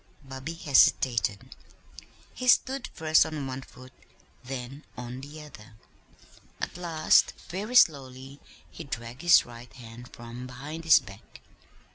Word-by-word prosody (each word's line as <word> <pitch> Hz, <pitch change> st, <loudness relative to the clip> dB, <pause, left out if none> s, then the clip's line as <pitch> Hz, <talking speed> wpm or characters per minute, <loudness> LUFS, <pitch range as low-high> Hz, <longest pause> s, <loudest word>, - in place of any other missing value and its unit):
Bobby 135 Hz, +4 st, -7 dB
hesitated. 120 Hz, -, +2 dB, 0.8 s
He 255 Hz, -, -6 dB
stood 260 Hz, +1 st, +3 dB
first 155 Hz, -1 st, +3 dB
on 155 Hz, -3 st, -5 dB
one 130 Hz, 0 st, -5 dB
foot, 130 Hz, 0 st, -15 dB, 0.5 s
then 130 Hz, +2 st, -7 dB
on 125 Hz, +1 st, -7 dB
the 150 Hz, +2 st, -10 dB
other. 110 Hz, -7 st, -14 dB, 0.8 s
At -, -, -4 dB
last, 165 Hz, -3 st, +2 dB, 0.2 s
very 205 Hz, +8 st, -5 dB
slowly 135 Hz, -, +2 dB, 0.3 s
he 165 Hz, -, -9 dB
dragged 125 Hz, -2 st, -7 dB
his 175 Hz, -1 st, +6 dB
right 120 Hz, 0 st, -12 dB
hand 120 Hz, 0 st, -12 dB
from 120 Hz, +2 st, -9 dB
behind 145 Hz, +6 st, -8 dB
his 155 Hz, -4 st, +7 dB
back. 100 Hz, -5 st, -15 dB
135 Hz, 125 wpm, -27 LUFS, 125-155 Hz, 0.8 s, his